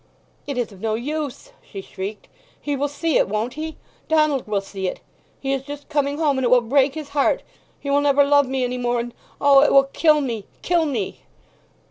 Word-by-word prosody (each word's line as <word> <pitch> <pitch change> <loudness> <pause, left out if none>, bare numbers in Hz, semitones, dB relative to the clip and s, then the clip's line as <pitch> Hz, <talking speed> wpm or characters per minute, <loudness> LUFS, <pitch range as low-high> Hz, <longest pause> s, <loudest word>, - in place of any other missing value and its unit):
"It 280 -3 -3
is 240 -3 -1
of 195 -2 -14
no 220 -1 0
use!" 295 - -4
she 200 - -9
shrieked. 195 +2 -7 0.3
"He 290 -1 -2
will 285 +1 0
see 290 +2 0
it, - - +2
won't 215 +4 -2
he? 315 +2 -6 0.3
Donald 305 -5 +2
will 210 -1 0
see 195 -1 -5
it! - - -4 0.4
He 270 0 -1
is 270 - -1
just 285 +1 -9
coming 290 -1 0
home—and 285 -4 +1
it 245 - +2
will 250 0 +6
break 270 +4 +2
his 305 -2 -6
heart—he 285 - -2
will 280 +1 +3
never 285 0 +4
love 285 -1 +4
me 260 0 -1
any 250 0 -2
more—and 240 -1 -1 0.3
O, 280 -1 +6
it 290 - +4
will 275 - +7
kill 310 -2 +4
me—kill 280 - -1
me!" 225 -9 -3
275 Hz, 195 wpm, -22 LUFS, 240-290 Hz, 0.4 s, will